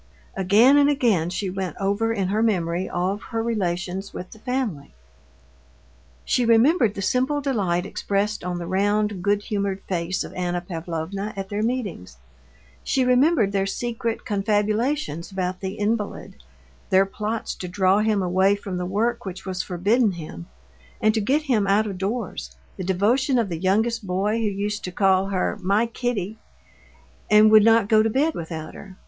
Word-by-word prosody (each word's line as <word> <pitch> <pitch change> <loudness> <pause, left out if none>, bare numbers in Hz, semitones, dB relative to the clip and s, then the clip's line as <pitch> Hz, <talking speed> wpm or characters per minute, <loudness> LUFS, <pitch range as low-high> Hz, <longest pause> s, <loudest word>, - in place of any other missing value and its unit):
Again 215 +9 +5
and 285 0 +5
again 225 - +2
she 185 +1 -3
went 190 -1 -4
over 200 +3 0
in 195 -4 -1
her 210 +3 +1
memory 180 -5 0
all 185 +3 -1
her 225 +1 -4
relations 190 -3 -2
with 180 - -7
the 220 - -13
family. 230 - -3 1.3
She 250 - +1
remembered 230 - +4
the 195 - -4
simple 260 +8 +1
delight 195 -11 0
expressed 200 +1 -2
on 180 0 -3
the 175 - -5
round, 205 +2 0
good 205 +2 +1
humored 200 -2 -2
face 175 0 -2
of - - -9
Anna 180 -1 -2
Pavlovna 175 +3 -5
at 195 -1 -5
their 205 +1 -2
meetings; 215 - -3 0.7
she 265 -2 +1
remembered 250 -3 +3
their 195 -1 0
secret 230 +1 -3
confabulations 210 - -1
about 185 -1 -3
the 190 0 -4
invalid, 210 0 -3 0.5
their 190 +1 +5
plots 215 +3 -4
to 180 - -7
draw 185 +2 +2
him 215 -2 +1
away 190 +2 +3
from 195 -2 -6
the 180 0 -3
work 230 +5 -1
which 190 -1 -7
was 185 -1 -2
forbidden 200 +5 +1
him, 155 - -8 0.5
and 215 0 +3
to 220 - 0
get 275 +9 +1
him 230 -9 +1
out 205 +2 +3
of 195 -3 -5
doors; 195 - -4 0.2
the - - -5
devotion 225 +9 +2
of 230 -4 +1
the 165 -2 -4
youngest 215 +4 0
boy, 195 +4 0
who 225 - -1
used 205 +1 -2
to 180 - -4
call 190 +1 +2
her 195 +1 -1
"my 200 +5 +2
Kitty," 225 -3 -3 0.9
and 215 0 +6
would 215 -1 +8
not 225 -2 +5
go 215 0 +5
to 220 - +1
bed 290 +8 +1
without 160 - -6
her. 190 -1 -12
200 Hz, 170 wpm, -23 LUFS, 185-225 Hz, 1.3 s, would